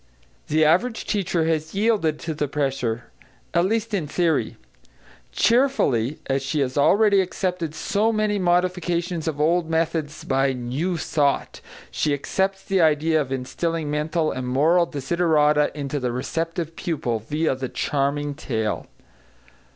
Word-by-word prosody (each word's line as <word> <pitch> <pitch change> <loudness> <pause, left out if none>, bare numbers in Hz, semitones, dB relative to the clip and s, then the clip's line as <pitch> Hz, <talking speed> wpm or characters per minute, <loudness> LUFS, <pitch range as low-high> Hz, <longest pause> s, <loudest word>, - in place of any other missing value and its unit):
The 155 +1 +3
average 205 +10 +2
teacher 180 -5 0
has 160 +1 -1
yielded 200 -7 +1
to 160 - -3
the 150 -1 -2
pressure, 135 -5 -2 0.4
at 170 +1 +3
least 225 +2 -1
in 175 -7 -1
theory. 165 +1 0 0.7
Cheerfully, 195 - +2
as 135 0 0
she 145 +3 -2
has 130 -1 -1
already 200 +7 +4
accepted 180 -3 -3
so 210 +7 +1
many 215 -2 0
modifications 175 -2 0
of 150 -3 -2
old 165 +2 +2
methods 160 -2 -1
by 135 0 +1
"new 130 +9 -2
thought," 145 -3 0 0.3
she 150 -2 0
accepts 190 +7 -1
the 195 -2 +1
idea 155 0 +3
of 135 -2 -5
instilling 150 +4 -2
mental 155 +2 0
and 130 -1 -4
moral 160 +7 +3
desiderata 150 0 +2
into 145 0 -3
the 125 -2 -1
receptive 165 +6 -3
pupil, 125 -9 -2
viâ 150 +5 -1
the 130 -1 -3
charming 145 +1 -1
tale. 110 -8 -3
155 Hz, 135 wpm, -23 LUFS, 140-175 Hz, 0.7 s, already